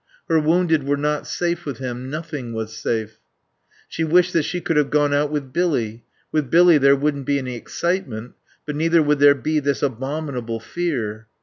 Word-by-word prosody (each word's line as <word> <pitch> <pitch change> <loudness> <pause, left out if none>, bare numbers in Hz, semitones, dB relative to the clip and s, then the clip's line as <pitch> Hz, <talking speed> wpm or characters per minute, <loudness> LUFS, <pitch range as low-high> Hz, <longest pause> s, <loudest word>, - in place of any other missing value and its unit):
Her 160 - +3
wounded 160 0 +2
were 140 +1 0
not 150 +1 -1
safe 175 -1 -2
with 140 -6 -5
him. 125 0 -5
Nothing 150 -5 -5
was 110 0 -5
safe. 110 -1 -3 0.7
She 165 - -3
wished 180 +3 +3
that 165 - +3
she 180 - -2
could 165 -1 -1
have 150 -2 +2
gone 145 -1 +2
out 145 +1 +2
with 140 -3 -4
Billy; 120 -11 -1 0.3
with 150 -4 0
Billy 170 0 +6
there 140 0 +5
wouldn't 140 -1 -1
be 140 - +2
any 130 -2 -4
excitement, 125 - -3 0.3
but 150 - -4
neither 165 +1 +3
would 150 -1 +2
there 145 0 +7
be 155 +4 0
this 140 0 -1
abominable 130 -3 -3
fear. 115 -8 -3
145 Hz, 185 wpm, -21 LUFS, 125-160 Hz, 0.7 s, there